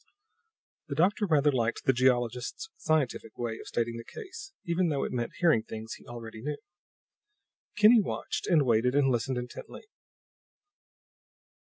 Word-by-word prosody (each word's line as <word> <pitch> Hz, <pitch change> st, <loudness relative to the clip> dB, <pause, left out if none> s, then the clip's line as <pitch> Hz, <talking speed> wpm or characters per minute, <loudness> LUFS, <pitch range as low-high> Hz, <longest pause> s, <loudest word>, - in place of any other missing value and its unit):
The -, -, -4 dB
doctor 200 Hz, +5 st, +2 dB
rather 150 Hz, -3 st, +4 dB
liked 120 Hz, -3 st, -1 dB
the 135 Hz, -, +5 dB
geologist's 125 Hz, -, 0 dB
scientific 145 Hz, -8 st, -1 dB
way 115 Hz, -2 st, -3 dB
of -, -, -10 dB
stating 115 Hz, 0 st, -1 dB
the 115 Hz, -, -7 dB
case, 395 Hz, -, -9 dB
even 170 Hz, +1 st, +1 dB
though 140 Hz, -3 st, 0 dB
it -, -, -3 dB
meant 120 Hz, -1 st, -2 dB
hearing 165 Hz, -10 st, +4 dB
things 110 Hz, +1 st, -7 dB
he -, -, -13 dB
already 115 Hz, -2 st, -8 dB
knew. 145 Hz, +3 st, -3 dB, 1.2 s
Kinney 225 Hz, +1 st, +7 dB
watched 195 Hz, -, -3 dB
and 160 Hz, -6 st, +4 dB
waited 120 Hz, +2 st, +2 dB
and 140 Hz, -2 st, +4 dB
listened 125 Hz, +1 st, 0 dB
intently. 125 Hz, -, -7 dB
130 Hz, 145 wpm, -29 LUFS, 120-170 Hz, 1.2 s, Kinney